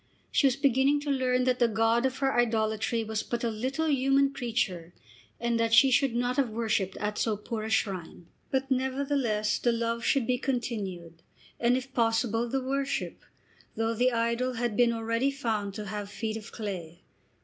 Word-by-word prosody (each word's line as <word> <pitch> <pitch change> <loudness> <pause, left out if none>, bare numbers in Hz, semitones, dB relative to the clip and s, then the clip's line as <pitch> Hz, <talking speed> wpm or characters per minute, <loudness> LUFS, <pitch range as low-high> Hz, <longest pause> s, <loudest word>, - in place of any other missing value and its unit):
She 280 - +4
was 255 - +1
beginning 275 +1 +3
to 290 -1 -2
learn 255 -2 +1
that 250 0 +1
the 240 - +5
god 225 +3 +2
of 260 0 -5
her 270 0 +1
idolatry 225 -1 +1
was 220 0 -2
but 240 0 -4
a 235 - 0
little 260 +8 -2
human 275 -1 +3
creature, 195 -10 -2 0.4
and 235 0 0
that 230 0 +3
she 270 +1 +7
should 255 -1 +3
not 245 +2 0
have 270 -4 +2
worshipped 215 -4 -1
at 210 0 -3
so 220 -2 0
poor 220 +2 -5
a 220 - -4
shrine. 185 -5 -2 0.2
But 265 0 -1
nevertheless 260 -5 0
the 240 - +2
love 230 0 -1
should 270 -1 +2
be 250 0 0
continued, 195 -11 -4 0.4
and, 240 +1 +3
if 260 +1 -7
possible, 225 0 +1
the 270 +1 -1
worship, 275 +1 -2 0.5
though 225 0 0
the 250 +3 +2
idol 235 +2 0
had 235 -2 -2
been 240 0 +4
already 230 +3 0
found 220 -8 -2
to 210 -1 -5
have 205 0 -5
feet 220 +1 -4
of 225 0 -8
clay. 180 -6 -6
235 Hz, 180 wpm, -28 LUFS, 220-260 Hz, 0.5 s, she